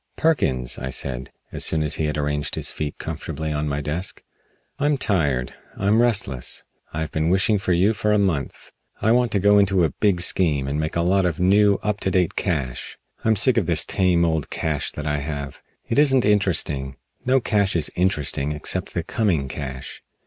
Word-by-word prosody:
"Perkins," 65 - 0
I 65 - -4
said, 65 -1 -3 0.2
as - - -3
soon 80 -1 +1
as 75 - 0
he - - +1
had 75 0 -2
arranged 75 0 -1
his - - -1
feet 75 -2 -5
comfortably 80 +1 -5
on 75 0 -2
my 70 0 -2
desk, 80 +6 0 0.6
"I'm 145 0 +2
tired. 70 - 0 0.2
I'm 105 +4 +3
restless. 100 - 0 0.3
I 80 - -4
have 80 - -4
been 80 +1 0
wishing 100 +3 +2
for 95 - -2
you 95 +5 +3
for 105 -1 -1
a 105 - +4
month. 90 -9 -2 0.3
I 110 - +2
want 120 -1 +2
to 100 - +2
go 100 +1 +5
into 95 -3 +3
a 80 - +1
big 100 -4 +1
scheme 80 -6 +1
and 70 +2 -2
make 80 0 -3
a 85 - +1
lot 95 +1 +2
of 80 -1 -3
new, 100 +3 +4
up 105 -1 -1
to - - -1
date 90 -3 +1
cash. 70 -10 -3 0.3
I'm 110 0 +3
sick 120 +5 +4
of 100 -8 +1
this 85 -2 +3
tame, 90 -3 +2
old 80 -3 -1
cash 75 -3 -2
that 75 - -6
I 75 -1 0
have. 70 -1 -6 0.3
It 115 - +1
isn't 135 -4 +4
interesting. 85 -10 +1 0.3
No 130 +1 +3
cash 100 -5 +1
is 80 -3 0
interesting 75 -5 0
except 75 - -3
the - - -1
coming 90 -11 0
cash." 65 -2 -7
85 Hz, 200 wpm, -22 LUFS, 75-100 Hz, 0.6 s, go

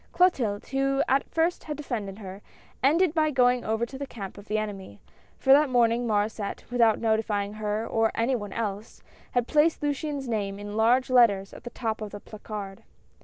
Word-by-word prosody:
Clotilde, 250 - +2
who 275 0 +1
at 270 +1 +1
first 330 +2 0
had 300 -2 -5
defended 220 -9 -4
her, 195 -1 -9 0.4
ended 315 +5 +3
by 310 -2 +2
going 250 -3 +3
over 220 +2 0
to 265 +2 -10
the 280 - -4
camp 200 -7 -8
of 200 +1 -13
the 215 - 0
enemy, 195 - -5 0.4
for 265 - +5
that 290 0 +5
morning 240 -1 +2
INIaurdsset, 210 -1 -2
without 230 -3 +4
notifying 220 -2 0
her 215 +1 -2
or 225 -1 +1
any 235 +3 +1
one 205 -4 -5
else, 210 -1 -5 0.3
had 245 -1 +2
placed 305 +1 +2
Luciane's 290 -1 -2
name 200 -4 -2
in 205 0 -7
large 245 +4 +3
letters 205 -6 +4
at - - -12
the - - -4
top 225 -3 -3
of 215 - -4
the 205 - -8
placard. 205 -2 -8
230 Hz, 185 wpm, -26 LUFS, 205-270 Hz, 0.4 s, for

